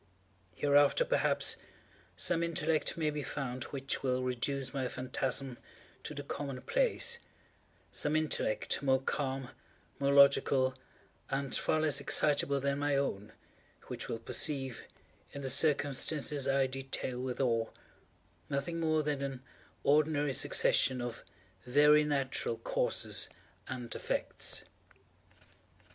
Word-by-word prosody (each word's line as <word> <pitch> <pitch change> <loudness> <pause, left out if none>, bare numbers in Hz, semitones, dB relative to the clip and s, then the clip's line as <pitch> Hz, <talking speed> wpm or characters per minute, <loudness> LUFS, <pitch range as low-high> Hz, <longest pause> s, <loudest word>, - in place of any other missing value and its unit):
Hereafter, 145 - +4
perhaps, - - +2 0.6
some 170 -1 +1
intellect 160 -2 +1
may 155 -2 +1
be 150 0 -3
found 130 -4 -4
which 135 -1 -3
will 130 -1 0
reduce 130 +2 -2
my 135 -2 -1
phantasm 130 0 -2 0.4
to 150 - -7
the 145 - -5
common 140 -2 -5
place—some 475 - -2
intellect 155 -8 0
more 130 -1 +3
calm, 135 -1 -3 0.5
more 140 0 +2
logical, 140 -2 +5 0.6
and 135 -1 -1
far 155 - +1
less 150 -2 +2
excitable 140 -1 +2
than 140 +1 -1
my 145 -1 +1
own, 110 -7 -2 0.6
which - - -5
will - - -2
perceive, 135 +2 -2 0.5
in 140 - -6
the 130 - +1
circumstances 145 0 +2
I 135 0 +3
detail 130 -1 -3
with 130 -1 -4
awe, 115 -4 +1 0.8
nothing 140 +5 -2
more 155 -1 +1
than 145 -2 -1
an 135 -2 -4 0.4
ordinary 145 -1 +2
succession 130 +1 +3
of 120 -1 -5 0.4
very 150 +3 +6
natural 135 -5 -1
causes 115 - -1 0.4
and 125 -3 -5
effects. - - -2
140 Hz, 115 wpm, -32 LUFS, 130-150 Hz, 0.8 s, very